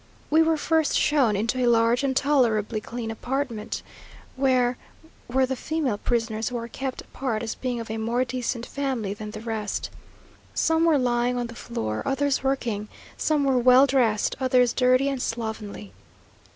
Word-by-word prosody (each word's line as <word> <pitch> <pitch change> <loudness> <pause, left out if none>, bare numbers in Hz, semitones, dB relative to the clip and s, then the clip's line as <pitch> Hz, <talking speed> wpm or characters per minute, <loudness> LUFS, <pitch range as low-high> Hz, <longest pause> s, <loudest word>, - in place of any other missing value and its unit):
We 315 +2 +6
were 320 0 +3
first 320 0 +1
shown 265 -8 +3
into 225 +6 -1
a - - +3
large 230 +2 +3
and 265 -1 +1
tolerably 230 -7 +2
clean 230 0 -5
apartment, 240 -1 -3 0.5
where 255 -2 +2 0.5
were 260 +2 +2
the 265 +1 -2
female 275 -6 -2
prisoners 225 -1 -1
who 245 - -3
are 230 0 -5
kept 265 +2 -5
apart 235 -4 -3
as 225 - -3
being 250 -2 -3
of 230 -1 -6
a 220 - -3
more 235 +3 0
decent 245 -1 -3
family 260 -8 -2
than 210 +1 -7
the 215 0 -8
rest. 220 -3 -3 0.6
Some 325 0 +2
were 325 -3 +4
lying 245 -1 +1
on 245 - -1
the 230 - -8
floor, 110 - -4
others 275 0 0
working 235 -6 -1 0.3
some 300 -2 +1
were 265 -2 +3
well 255 +2 +7
dressed, 240 -6 +1
others 255 -2 +3
dirty 255 +1 +3
and 275 -2 -2
slovenly. 220 - -5
245 Hz, 165 wpm, -25 LUFS, 225-270 Hz, 0.6 s, well